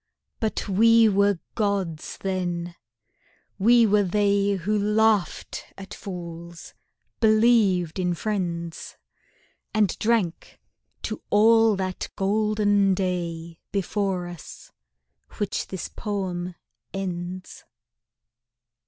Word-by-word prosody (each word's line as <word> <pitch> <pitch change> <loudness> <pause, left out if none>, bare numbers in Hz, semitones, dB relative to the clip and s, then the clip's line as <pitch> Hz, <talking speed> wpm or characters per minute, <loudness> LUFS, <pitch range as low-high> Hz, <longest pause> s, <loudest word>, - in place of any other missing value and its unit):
But 220 -1 -2
we 225 +3 +5
were 200 -1 +3 0.2
Gods 195 -7 -2
then: 175 -2 -3 0.9
we 235 +3 +6
were 210 -1 +4
they 200 +1 +2
Who 195 +3 -1
laughed 210 -1 +1
at 195 0 -9
fools, 170 -2 -8 0.5
believed 215 -6 +3
in 180 -1 0
friends, 170 -4 -4 0.8
And 210 -4 +2
drank 215 -7 -1 0.4
to - - -4
all 225 +1 +5
that 185 -1 -3
golden 205 -1 +2
day 170 -3 -3
Before 195 -2 -1
us, 175 -3 -10 0.7
which 205 - -2
this 190 -3 -5
poem 185 -4 -4 0.4
ends. 185 -1 -5
195 Hz, 90 wpm, -25 LUFS, 175-210 Hz, 0.9 s, we